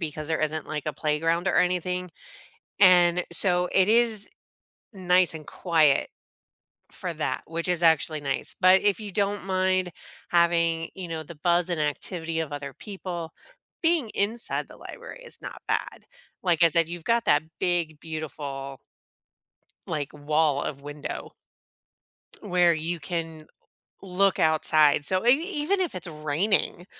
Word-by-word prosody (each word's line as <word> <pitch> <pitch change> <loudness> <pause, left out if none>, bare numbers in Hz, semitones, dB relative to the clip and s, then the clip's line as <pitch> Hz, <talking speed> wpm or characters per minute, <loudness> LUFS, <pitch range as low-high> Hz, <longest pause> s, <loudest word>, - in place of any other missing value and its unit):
because 155 -1 -5
there 160 - -1
isn't, 155 0 -2
like, 150 -2 -4
a 155 - -1
playground 165 +4 0
or - - +1
anything, 180 0 0 0.7
and, 180 -2 +6
so, 180 0 +4
it 190 0 +4
is 225 -2 +3 0.6
nice 180 -2 +3
and 155 -2 -9
quiet 160 -6 +2 0.8
for - - -5
that, - - -3
which 165 +1 -4
is 175 -1 0
actually 160 -2 +3
nice; 135 -2 -2
but 185 +1 +6
if 205 -1 +2
you 210 -2 -7
don't 205 +1 -1
mind 185 -1 0 0.4
having, 170 -1 +2
you 185 -2 -7
know, 160 -1 -4
the 160 +2 -11
buzz 175 +3 +1
and 170 - -1
activity 160 +2 -2
of 155 -2 -4
other 140 -1 -6
people, 180 -5 -7 0.5
being 325 -7 +2
inside 220 +4 -1
the - - -13
library - - -11
is - - -4
not - - -9
bad. - - -2 0.4
Like 175 -2 +2
I - - +7
said, 165 +1 +2
you've 175 -1 -7
got 230 0 +1
that 145 +1 +4 0.2
big, 170 -4 -1
beautiful 140 -4 -6 1.1
like, 145 -3 -4
wall 150 0 +1
of 140 - -5
window 145 +1 -7 1.1
where 180 -3 +3
you 165 +2 -3
can 160 +1 -5 0.6
look 195 +1 +1
outside. 155 -2 +3
So, 185 +6 0
e 240 - +7 0.3
even 390 +7 +1
if 360 - -2
it's 180 - -5
raining 160 +4 0
170 Hz, 145 wpm, -26 LUFS, 155-185 Hz, 1.1 s, I